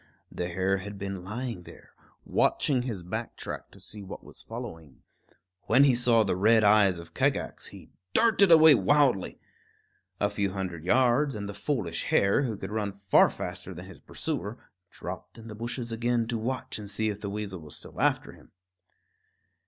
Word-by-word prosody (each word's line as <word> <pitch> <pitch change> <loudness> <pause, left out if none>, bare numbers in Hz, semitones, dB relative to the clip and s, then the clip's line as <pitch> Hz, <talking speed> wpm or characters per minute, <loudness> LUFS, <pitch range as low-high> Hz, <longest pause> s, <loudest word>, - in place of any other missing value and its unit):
The 90 - -3
hare 95 +2 0
had 100 +1 -7
been 95 -2 -5
lying 115 0 -5
there, - - -15 0.3
watching 135 -4 +2
his 115 -8 -5
back 90 - -5
track - - -7
to - - -17
see 105 - -10
what 95 - -9
was - - -12
following. 80 -5 -9 0.6
When 130 +5 +6
he 140 -2 +5
saw 120 -2 +3
the 95 -3 0
red 110 +4 +4
eyes 100 -3 +5
of 85 0 -11
Kagax, - - -1
he - - -13 0.2
darted 210 -5 +5
away 160 -1 +9
wildly. 140 -10 +2 0.8
A 105 0 +1
few 100 -2 -1
hundred 90 -4 -5
yards, 130 +5 +3
and 100 -1 -5
the 100 - -6
foolish 100 - -2
hare, 100 +6 +3
who 115 -7 -2
could 95 0 -7
run 105 -2 -2
far 100 -1 +4
faster - - -6
than - - -8
his - - -13
pursuer, 105 +6 -4 0.3
dropped - - -8
in 115 0 -11
the 110 - -7
bushes 120 +2 -5
again 120 +1 0
to 120 - -1
watch 130 +1 -3
and 105 -1 -7
see 110 +2 -1
if 105 0 -5
the 100 - -4
weasel 100 -2 -5
was 75 -2 -8
still - - -8
after - - +1
him. - - -18
105 Hz, 180 wpm, -28 LUFS, 95-120 Hz, 0.8 s, away